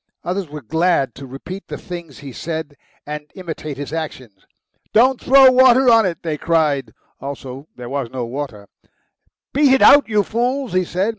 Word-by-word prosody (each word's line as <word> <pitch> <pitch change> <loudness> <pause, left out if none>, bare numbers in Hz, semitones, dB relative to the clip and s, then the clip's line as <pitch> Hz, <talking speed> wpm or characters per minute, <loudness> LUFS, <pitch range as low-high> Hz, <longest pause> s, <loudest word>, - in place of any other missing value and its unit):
Others 180 -1 -3
were 150 -1 -9
glad 160 -2 +1
to 135 0 -10
repeat 180 +9 -9
the - - -6
things 170 -6 -9
he 140 -1 -9
said 160 +2 -5 0.3
and 150 0 -7
imitate 160 -6 -7
his 145 +1 -6
actions. 130 -11 -7 0.5
"Don't 255 +3 +4
throw 265 0 +7
water 255 0 +5
on 225 -3 +5
it!" 170 -3 -5
they 155 -3 -3
cried. 150 -8 0 0.3
Also 135 0 -8
there 125 -1 -9
was 135 -2 -3
no 125 -1 -4
water. 115 -5 -6 0.9
"Beat 280 -1 +4
it - - +2
out, 285 -4 +7
you 210 -2 +2
fools!" 245 +2 -2
he 185 0 +1
said. 185 +5 -1
160 Hz, 170 wpm, -19 LUFS, 140-210 Hz, 0.9 s, throw